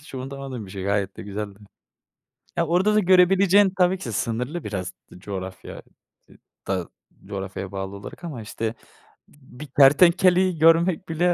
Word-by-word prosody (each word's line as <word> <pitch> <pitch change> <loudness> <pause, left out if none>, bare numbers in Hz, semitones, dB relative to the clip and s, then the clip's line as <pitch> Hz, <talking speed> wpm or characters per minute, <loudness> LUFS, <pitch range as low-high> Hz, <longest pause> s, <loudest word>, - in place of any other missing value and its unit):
hiç 145 - -14
unutamadığım 130 -3 -6
bir - - -12
şey 95 -1 -6
gayet 100 -1 -1
de - - -8
güzeldi. 100 0 -6 1.0
Ya, 170 -2 +1
orada 190 +5 +2
da 215 - +5
görebileceğin 190 +1 +4
tabii 180 0 +3
ki 125 -10 -6
sınırlı 125 - -3
biraz 95 -3 -5 0.2
coğrafya 95 -1 -7 0.5
dı - - -19 0.3
da 95 -3 -2 0.4
coğrafyaya 95 -1 -6
bağlı 95 0 -5
olarak 100 - -11
ama 150 -9 -6
işte 110 +1 -4 0.5
b 130 -4 -19
bir 150 - -7
kertenkeleyi 175 +6 +4
görmek 165 +2 +3
bile 175 +2 +2
135 Hz, 150 wpm, -23 LUFS, -, 1.0 s, da